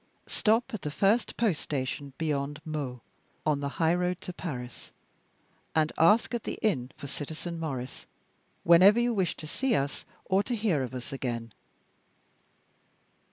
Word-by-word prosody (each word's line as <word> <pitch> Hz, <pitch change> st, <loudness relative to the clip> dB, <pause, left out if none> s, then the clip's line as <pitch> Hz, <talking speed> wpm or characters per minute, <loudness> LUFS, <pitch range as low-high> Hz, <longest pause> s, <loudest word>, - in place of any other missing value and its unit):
Stop 225 Hz, +3 st, +1 dB
at 215 Hz, -, -3 dB
the 150 Hz, -, -3 dB
first 200 Hz, +9 st, +2 dB
post 215 Hz, -9 st, +1 dB
station 140 Hz, 0 st, -3 dB
beyond 145 Hz, -2 st, -1 dB
Meaux, 140 Hz, -6 st, -4 dB, 0.4 s
on 150 Hz, -2 st, +2 dB
the 140 Hz, 0 st, -2 dB
high 165 Hz, 0 st, +4 dB
road 180 Hz, 0 st, 0 dB
to 180 Hz, -, -6 dB
Paris, 125 Hz, -9 st, -6 dB, 0.8 s
and 155 Hz, -1 st, +3 dB
ask 210 Hz, +10 st, +5 dB
at 240 Hz, -, -1 dB
the -, -, -4 dB
inn 130 Hz, -, +1 dB
for -, -, -8 dB
Citizen 160 Hz, +4 st, -5 dB
Maurice, 135 Hz, -5 st, -5 dB, 0.6 s
whenever 185 Hz, +6 st, +7 dB
you 240 Hz, 0 st, +2 dB
wish 190 Hz, -5 st, 0 dB
to 155 Hz, -, -7 dB
see 250 Hz, -, 0 dB
us 140 Hz, +1 st, -1 dB, 0.2 s
or 190 Hz, +1 st, +3 dB
to 240 Hz, +3 st, -2 dB
hear 205 Hz, -10 st, +1 dB
of 130 Hz, 0 st, -4 dB
us 125 Hz, +3 st, -6 dB
again." 120 Hz, -4 st, -3 dB
160 Hz, 155 wpm, -29 LUFS, 140-195 Hz, 0.8 s, whenever